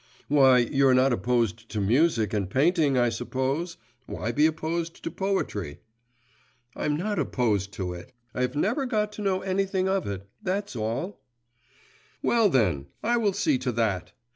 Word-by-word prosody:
Why, 135 Hz, -3 st, +6 dB
you're 130 Hz, +2 st, +3 dB
not 130 Hz, 0 st, +4 dB
opposed 115 Hz, -2 st, 0 dB
to 110 Hz, -, -3 dB
music 115 Hz, -, +2 dB
and 100 Hz, -3 st, -1 dB
painting, 145 Hz, -, +2 dB
I 120 Hz, -1 st, +3 dB
suppose; 135 Hz, +8 st, -2 dB, 0.3 s
why 115 Hz, -, -3 dB
be 150 Hz, +6 st, +4 dB
opposed 165 Hz, +1 st, -3 dB
to -, -, -3 dB
poetry?' 105 Hz, -, -2 dB, 0.9 s
'I'm 150 Hz, -, -1 dB
not 205 Hz, +2 st, -2 dB
opposed 110 Hz, -8 st, 0 dB
to 90 Hz, -2 st, -4 dB
it; 85 Hz, 0 st, -10 dB, 0.2 s
I -, -, -3 dB
have 125 Hz, +2 st, -1 dB
never 240 Hz, -, 0 dB
got 210 Hz, -3 st, 0 dB
to 210 Hz, -, -8 dB
know 190 Hz, -2 st, 0 dB
anything 190 Hz, 0 st, 0 dB
of 190 Hz, 0 st, 0 dB
it 100 Hz, -1 st, -5 dB
that's 200 Hz, -2 st, -2 dB
all.' 120 Hz, -, -3 dB, 1.0 s
'Well, 230 Hz, -3 st, +4 dB
then, 90 Hz, -, +1 dB, 0.2 s
I 240 Hz, +2 st, +2 dB
will 210 Hz, -4 st, +1 dB
see 155 Hz, -9 st, +1 dB
to 125 Hz, 0 st, -1 dB
that! 100 Hz, -5 st, -1 dB
135 Hz, 160 wpm, -26 LUFS, 115-185 Hz, 1.0 s, Why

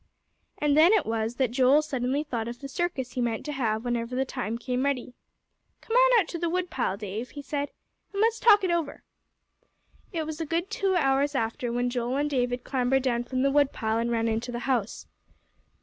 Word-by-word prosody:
And 295 Hz, -1 st, +2 dB
then 325 Hz, +6 st, +7 dB
it 420 Hz, -7 st, +3 dB
was 225 Hz, +1 st, -2 dB
that 255 Hz, -2 st, 0 dB
Joel 265 Hz, +4 st, +4 dB
suddenly 270 Hz, 0 st, -1 dB
thought 235 Hz, -6 st, -3 dB
of 240 Hz, +1 st, -6 dB
the 275 Hz, -, -7 dB
circus 275 Hz, -4 st, -2 dB
he 250 Hz, -, -3 dB
meant 230 Hz, -2 st, -2 dB
to 300 Hz, -, -3 dB
have 230 Hz, -5 st, -1 dB
whenever 240 Hz, 0 st, -2 dB
the 265 Hz, +1 st, +1 dB
time 240 Hz, -4 st, -3 dB
came 250 Hz, +2 st, -2 dB
ready. 265 Hz, -3 st, -1 dB, 0.7 s
"Come 455 Hz, -, -4 dB
on -, -, +6 dB
out 365 Hz, -, 0 dB
to 340 Hz, -, -4 dB
the 340 Hz, 0 st, 0 dB
woodpile, 335 Hz, -, -1 dB
Dave," 210 Hz, +3 st, -5 dB
he 285 Hz, -, -9 dB
said, 285 Hz, 0 st, -3 dB, 0.4 s
"and 400 Hz, -, -4 dB
let's 450 Hz, +1 st, +2 dB
talk 420 Hz, -3 st, +6 dB
it 365 Hz, -, +1 dB
over." 330 Hz, -4 st, -2 dB, 1.1 s
It 325 Hz, -4 st, -2 dB
was 315 Hz, +1 st, -5 dB
a -, -, -1 dB
good 340 Hz, +6 st, -1 dB
two 390 Hz, -3 st, 0 dB
hours 280 Hz, -2 st, +2 dB
after 230 Hz, 0 st, -1 dB
when 245 Hz, +1 st, 0 dB
Joel 245 Hz, +1 st, -1 dB
and 295 Hz, +1 st, 0 dB
David 245 Hz, -2 st, 0 dB
clambered 260 Hz, 0 st, +1 dB
down 240 Hz, -2 st, 0 dB
from 255 Hz, +1 st, -1 dB
the 275 Hz, -, +3 dB
woodpile, 260 Hz, -6 st, +1 dB
and 235 Hz, +1 st, 0 dB
ran 230 Hz, -1 st, 0 dB
into 225 Hz, +2 st, -2 dB
the 240 Hz, 0 st, -4 dB
house. 240 Hz, -6 st, -1 dB
265 Hz, 210 wpm, -27 LUFS, 240-305 Hz, 1.1 s, then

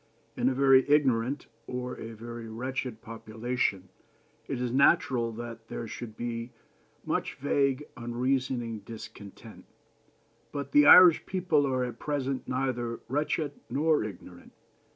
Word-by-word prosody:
In 130 Hz, -, +2 dB
a 130 Hz, -, -2 dB
very 135 Hz, -1 st, +6 dB
ignorant 135 Hz, -2 st, +2 dB, 0.2 s
or 125 Hz, 0 st, -4 dB
a 115 Hz, 0 st, -7 dB
very 115 Hz, +1 st, -8 dB
wretched 125 Hz, 0 st, -4 dB
population 110 Hz, -3 st, -3 dB, 0.6 s
it 135 Hz, -, -3 dB
is 125 Hz, -1 st, -2 dB
natural 130 Hz, -3 st, +3 dB
that 115 Hz, 0 st, -8 dB
there 115 Hz, -, -5 dB
should 110 Hz, -1 st, -8 dB
be 115 Hz, 0 st, -4 dB, 0.6 s
much -, -, -2 dB
vague, 140 Hz, 0 st, 0 dB
unreasoning 120 Hz, -1 st, -2 dB
discontent; 105 Hz, -2 st, -11 dB, 0.9 s
but 140 Hz, -1 st, -5 dB
the 145 Hz, 0 st, +6 dB
Irish 180 Hz, -3 st, +9 dB
people 170 Hz, -6 st, +1 dB
are 130 Hz, -1 st, 0 dB
at 120 Hz, -2 st, -5 dB
present 135 Hz, -3 st, -2 dB
neither 125 Hz, -3 st, -2 dB
wretched 150 Hz, +2 st, -1 dB, 0.2 s
nor 155 Hz, -1 st, +2 dB
ignorant. 90 Hz, -4 st, -10 dB
125 Hz, 125 wpm, -29 LUFS, 115-140 Hz, 0.9 s, Irish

